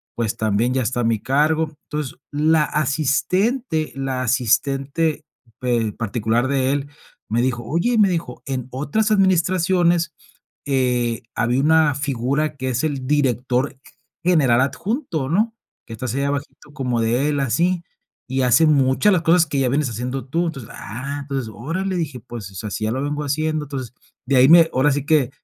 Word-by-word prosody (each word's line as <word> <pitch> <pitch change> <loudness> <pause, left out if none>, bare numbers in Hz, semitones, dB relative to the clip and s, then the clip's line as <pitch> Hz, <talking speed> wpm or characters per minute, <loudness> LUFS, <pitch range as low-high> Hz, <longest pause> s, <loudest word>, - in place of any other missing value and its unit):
pues 115 -3 -2
también 110 +3 +1
ya 130 - +1
está 120 +1 -1
a - - 0
mi 115 -2 +1
cargo. 155 +3 +1 0.2
Entonces, 150 -4 -4
la 155 +1 +3
asistente, 155 - 0
la 135 -1 -2
asistente 140 +6 0 0.3
pe 120 -4 0
particular 115 +3 -1
de 135 -1 +1
él, 140 0 -2 0.4
me 115 +2 +1
dijo, 120 -2 -1
oye 175 - 0
me 205 -2 +6
dijo, 170 -2 -4
en 130 -2 -3
otras 210 - 0
administraciones, 180 -3 +2 0.5
eh, 125 -4 0
había 125 +2 +1
una 155 -1 +4
figura 140 +2 -1
que 130 -1 -3
es 125 +2 -1
el 140 -4 -3
director 130 -2 0 0.5
general 145 -9 +4
adjunto, 170 - -2
¿no? 220 +6 +1 0.3
Que 115 - -9
está 115 +3 -6
así 130 +5 -2
abajito 145 +1 -4
como 125 -5 -1
de 120 +6 +1
él, 145 - 0
así, 170 +7 +1 0.5
y 130 0 0
hace 125 +6 +5
muchas 140 +6 +3
de - - +4
las 175 - +2
cosas 170 0 +4
que 140 -2 -1
ya 130 -2 +2
vienes 140 0 0
haciendo 125 +4 -4
tú. 170 +5 0
Entonces, 135 -8 -6
ah, 140 +7 -6
entonces, 135 -5 -4
órale, 180 - -3
dije, 145 -7 -3
pues, 110 -5 -9
o - - -16
sea, 105 +3 -5
sí - - -4
ya 110 - 0
lo 130 +3 -2
vengo 145 +1 -2
haciendo, 155 +2 -1
entonces, 130 -3 -6 0.3
de 135 +1 +1
ahí 130 +3 +6
me 165 -1 +7
ahora 140 +3 +3
sí 145 0 -2
que 145 -5 +3
140 Hz, 175 wpm, -21 LUFS, 125-160 Hz, 0.5 s, me